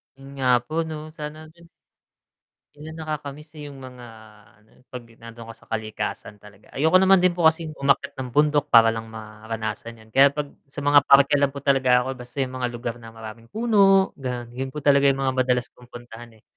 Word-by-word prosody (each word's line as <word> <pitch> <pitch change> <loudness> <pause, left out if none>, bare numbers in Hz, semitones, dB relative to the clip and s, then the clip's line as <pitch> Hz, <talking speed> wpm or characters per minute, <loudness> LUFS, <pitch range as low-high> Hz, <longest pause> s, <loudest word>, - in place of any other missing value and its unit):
'Yun 135 0 -15
nga 130 -2 -1 0.2
po 155 - -11
'no, 155 0 -8
sana 150 +1 -7
din. 170 0 -20 1.1
Ayun 160 +2 -10
nakakamiss, 150 0 -7
eh, 150 - -9
'yong 140 -1 -11
mga 125 -2 -11 0.5
ano, 105 - -29
eh, - - -26
'pag 125 -1 -8
nandoon 115 0 -13
ako 115 - -9
sa - - -23
kalikasan 110 -1 -5
talaga, 105 0 -18
ayoko 160 +6 +4
naman 190 -1 +4
din 185 - +4
po 170 -2 +3
kasing 160 -1 -1
umakyat 140 0 +1
ng 130 -1 -5
bundok, 150 -1 +2
para 115 -3 +6
lang 115 0 -6
maranasan 110 +1 -7
'yon, 110 - -22
kaya 135 +3 +6
'pag 145 0 -5 0.2
sa 145 +1 -8
mga 145 0 +6
parke 140 +1 +6
lang 140 -1 +2
po 140 -1 -9
talaga 130 -3 +3
ako, 130 - -5
basta 125 +2 -12
'yong 130 - -7
mga 125 -1 -1
lugar 120 0 -5
na 115 -1 -12
maraming 115 +1 -11
puno, 200 - +3
gano'n, 125 -2 -5
'yon 130 +2 -5
po 150 -2 -7
talaga 140 -1 +4
'yong 135 0 +1
mga 130 -1 0
madalas 125 -1 +1
kong 125 0 -19
puntahan, 120 0 -11
eh. - - -29
135 Hz, 205 wpm, -23 LUFS, 115-150 Hz, 1.1 s, para